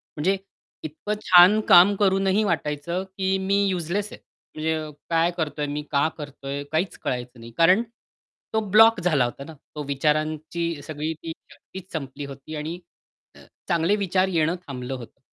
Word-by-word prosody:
म्हणजे 185 +6 +1 0.5
इतकं 160 +8 -4
छान 185 +4 +7
काम 185 +4 +8
करूनही 195 +1 +2
वाटायचं 170 0 -2
की 190 0 +1
मी 200 +1 +1
यूजलेस 185 +3 -2
आहे. - - -10 0.4
म्हणजे 160 +1 -1 0.3
काय 165 +1 +2
करतोय? 150 -2 -2
मी 145 +1 -3
का 140 +2 +3
करतोय? 140 -1 -6
काहीच 165 +3 -1
कळायचं 125 -1 -4
नाही. 115 0 -11
कारण 185 +7 +5 0.7
तो 220 - +3
ब्लॉक 225 +1 +6
झाला 155 -8 +2
होता 120 +3 -6
ना, 160 +2 -10 0.2
तो 150 - -4
विचारांची 155 +3 -1
सगळी 155 +1 -3
ती 165 - -4 0.2
शक्तीच 190 0 -12
संपली 140 -2 -5
होती 140 +3 -9
आणि 160 +4 -5 0.6
अ, - - -15 0.3
चांगले 170 +2 +2
विचार 190 -2 +1
येणं 165 +1 +1
थांबलं 130 -1 -5
होतं. 125 +1 -9
160 Hz, 155 wpm, -24 LUFS, 145-190 Hz, 0.7 s, काम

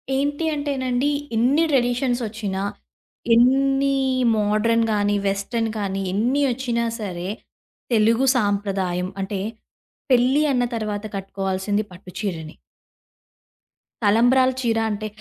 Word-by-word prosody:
ఏంటి 290 +3 -1
అంటేనండి, 275 -2 -1 0.3
ఇన్ని 260 +8 +3
ట్రెడిషన్స్ 245 -1 +1
ఒచ్చినా, 205 -3 -4 0.7
ఎన్ని 270 +3 +3 0.4
మోడ్రన్ 215 +2 +2
గాని, 205 0 +1
వెస్టర్న్ 210 +4 -1
కానీ, 195 -2 -2
ఎన్ని 245 +8 +1
ఒచ్చినా 235 -2 -1
సరే, 185 -3 -4 0.6
తెలుగు 230 +4 +3
సాంప్రదాయం 195 -4 -1
అంటే, 195 0 -3 0.7
పెళ్ళి 255 +4 +4
అన్న 245 - +2
తరువాత 215 -1 -3
కట్టుకోవాల్సింది 195 +1 -2
పట్టు 180 +1 -13
చీరనే. 165 -6 -4 1.5
తలంబ్రాల 245 +5 +4
చీర 230 -2 +1
అంటే 215 +1 -3
225 Hz, 100 wpm, -22 LUFS, 200-255 Hz, 1.5 s, పెళ్ళి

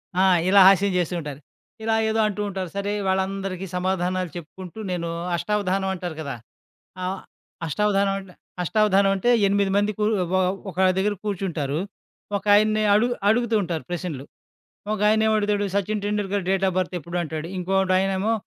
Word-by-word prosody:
ఆ! 185 - +2 0.3
ఇలా 200 0 +7
హాస్యం 195 0 +5
చేస్తూ 175 0 -1
ఉంటారు. 145 -3 -7 0.4
ఇలా 225 0 +1
ఏదో 220 +1 0
అంటూ 210 0 -3
ఉంటారు. 190 -2 -4
సరే, 200 +1 -1 0.2
వాళ్ళందరికీ 190 0 -1
సమాధానాలు 185 -1 -1
చెప్పుకుంటూ 180 +4 -10
నేను 170 -1 -2 0.3
అష్టావధానం 195 0 -1
అంటారు 175 -3 -5
కదా! 140 -4 -4 0.7
ఆహ్, 185 +1 -2 0.5
అష్టావధానం 200 +4 +1
అంట 195 -1 -12 0.3
అష్టావధానం 200 0 +3
అంటే 195 +5 0 0.2
ఎనిమిది 200 0 +1
మంది 205 +1 +2
కూరు 210 +1 +2 0.2
ఒ - - +3 0.3
ఒక 180 - -11 0.2
దగ్గర 205 +2 +1
కూర్చుంటారు. 170 -8 -2 0.6
ఒకయన్ని 215 +2 +3
అడుగు 240 +4 +3
అడుగుతూ 230 +1 +2
ఉంటారు 170 -3 -3
ప్రశ్నలు. 175 -6 -4 0.7
ఒకాయన 215 +1 +3
ఏమడతాడు, 210 -1 +1
Sachin 210 +1 0
Tendulkar 205 -2 -1
date 195 0 +1
of 185 - -2
birth 185 0 -1
ఎప్పుడు 170 +3 -7
అంటాడు, 155 0 -5
ఇంకొకడు 190 +1 +1
ఆయనేమో 195 +3 0
195 Hz, 145 wpm, -24 LUFS, 180-205 Hz, 0.7 s, ఇలా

